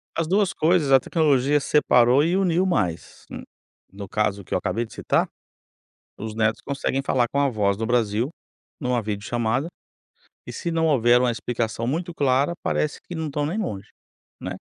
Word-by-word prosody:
As 165 -1 -1
duas 195 0 +2
coisas, 160 -5 +2
a 135 - +7
tecnologia 145 -3 +2
separou 130 -2 +4
e 170 +4 +1
uniu 185 -1 +2
mais, 90 - -2
hum, - - -7 0.5
no 100 +1 -8
caso 100 -1 -1
que - - -15
eu - - +2
acabei 120 +1 -2
de 110 - -14
citar - - 0 0.9
os 110 -1 -6
netos 110 0 +1
conseguem 135 -1 -2
falar 125 -3 +1
com 140 - -1
avós 105 -8 +1
do 115 - -3
Brasil 115 +1 +1 0.5
em 125 - -4
uma 125 -2 +1
videochamada 110 +6 -2 0.8
e - - -7
se 170 - -4
não 165 0 +1
houver 120 -3 +4
uma 125 -1 +2
explicação 115 0 -3
muito 170 +5 -2
clara, 140 +2 +1
parece 150 - -1
que 175 - -9
não 160 -1 -3
estão 145 0 -2
nem 175 +8 -3
longe, 105 - -4 0.5
né? - - -6
130 Hz, 175 wpm, -23 LUFS, 110-155 Hz, 0.9 s, a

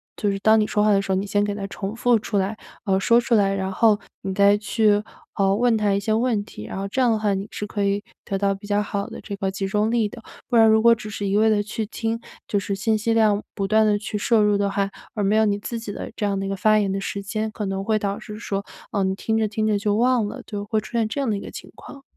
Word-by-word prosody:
就 205 - 0
是 195 - -3
当 220 +2 +5
你 215 - +2
说 210 - +1
话 210 - +4
的 195 -1 +4
时 195 - -4
候， - - +3
你 190 +2 -1
先 205 +1 +1
给 205 0 -1
它 200 -1 -4
重 200 +1 -5
复 245 0 +3
出 210 - -2
来， 200 +3 -1 0.3
呃， 190 -2 +2
说 230 +4 +4
出 235 0 +1
来。 195 -2 +3
然 190 -1 -2
后 210 +2 +3 0.2
你 190 -1 -3
再 200 +1 +5
去， 210 0 +2 0.3
呃， 195 -1 +2
问 240 +1 +3
他 210 -2 +1
一 200 - +1
些 215 +2 -1
问 225 -2 +1
题， 105 - -10
然 - - -6
后 195 +1 -3
这 260 - -1
样 245 -2 +4
的 220 - +2
话 210 -2 +1
你 195 +1 -3
是 210 - -4
可 205 0 -2
以 200 +1 0 0.2
得 195 - -2
到 200 0 +1
比 200 +2 -12
较 205 0 +1
好 200 -1 -3
的 - - -8
这 205 - -6
个 195 0 -1
集 195 0 -3
中 210 +2 +1
力 230 -3 +2
的。 235 +2 -11 0.3
不 245 - -1
然 225 -1 +7
如 220 0 +5
果 235 +1 +7
只 215 -1 -8
是 205 -1 -4
一 195 - 0
味 220 +1 +4
地 210 -1 +3
去 215 +1 -4
听， 225 +1 -3 0.3
就 205 - +1
是 200 0 -3
信 220 +3 +1
息 225 +2 0
量 215 -2 +3
不 195 -1 -1
断 220 +2 +4
地 210 -1 +3
去 210 0 -6
摄 220 +2 +3
入 210 0 +3
的 200 0 +1
话， 195 0 0 0.3
而 210 - -1
没 200 +2 +2
有 220 0 +4
你 205 -1 +1
自 230 +3 -5
己 225 -2 -6
的 - - -6
这 - - -5
样 200 -1 0
的 195 - -3
一 - - -3
个 195 - -1
发 215 +3 +3
言 200 -2 0
的 195 - -1
时 200 +1 -4
间， 215 +2 -2
可 215 - -4
能 195 0 -2
会 215 +1 +1
导 200 -1 -2
致 210 -2 -9
说， 200 -3 -3 0.3
呃， 200 -2 0
你 190 0 +1
听 220 +3 -1
着 220 -1 +1
听 215 +1 -2
着 210 -1 +2
就 205 0 0
忘 240 -1 +2
了， 255 +5 -7
就 205 -2 -5
会 215 +1 0
出 - - -12
现 225 -2 +2
这 250 - -4
样 275 - -1
的 210 - +1
一 - - -4
个 - - -8
情 - - -10
况。 275 - -12
210 Hz, 330 characters per minute, -23 LUFS, 200-220 Hz, 0.3 s, 然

